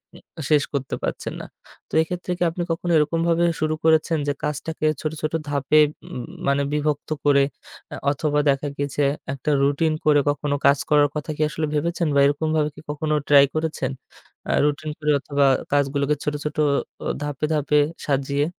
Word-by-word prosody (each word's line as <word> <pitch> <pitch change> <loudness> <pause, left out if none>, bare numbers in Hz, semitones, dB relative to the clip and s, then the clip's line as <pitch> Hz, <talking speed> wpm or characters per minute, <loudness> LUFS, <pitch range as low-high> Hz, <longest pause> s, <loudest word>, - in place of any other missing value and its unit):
উ - - -11 0.3
শেষ 150 -2 +4
করতে 135 -2 -2
পারছেন - - -3
না। - - -8 0.4
তো - - -24
এক্ষেত্রে 180 +2 -4
কি 175 - 0
আপনি 175 +2 -3
কখনো 170 +1 -2
এরকমভাবে 165 +2 +2 0.2
শুরু 155 0 0
করেছেন 160 0 +3
যে 145 - +1
কাজটাকে 150 +2 -3 0.2
ছোট, 155 - -2
ছোট 155 +1 -2 0.2
ধাপে 145 +1 +3 0.3
উম 125 - -6 0.2
মানে 140 0 +2
বিভক্ত 150 -1 -1 0.2
করে 140 -1 +5 0.5
আ - - -4 0.2
অথবা, 150 +1 0
দেখা 140 +1 +1
গিয়েছে 145 0 -2 0.3
একটা 140 +2 -4
রুটিন 145 +3 +2
করে 150 -1 +5
কখনো 145 0 -1
কাজ 140 0 +4
করার 145 -1 +5
কথা 150 - -4
কি - - -3
আসলে 155 0 -2
ভেবেছেন? 170 +2 0
বা, - - +5
এরকমভাবে 150 +1 +1
কি - - -12
কখনো 150 +1 -2 0.2
ট্রাই 140 -1 +8
করেছেন? 155 -4 -2 0.6
আ - - +2
রুটিন 150 +1 -1
করে 150 -1 0
অথবা, 140 0 +1 0.3
কাজগুলোকে 140 +1 +1
ছোট, 150 - -1
ছোট 150 - -4 0.5
অ - - -1
ধাপে, 145 0 -2
ধাপে 150 0 +1 0.3
সাজিয়ে? 140 0 0
150 Hz, 170 wpm, -23 LUFS, 140-155 Hz, 0.6 s, ট্রাই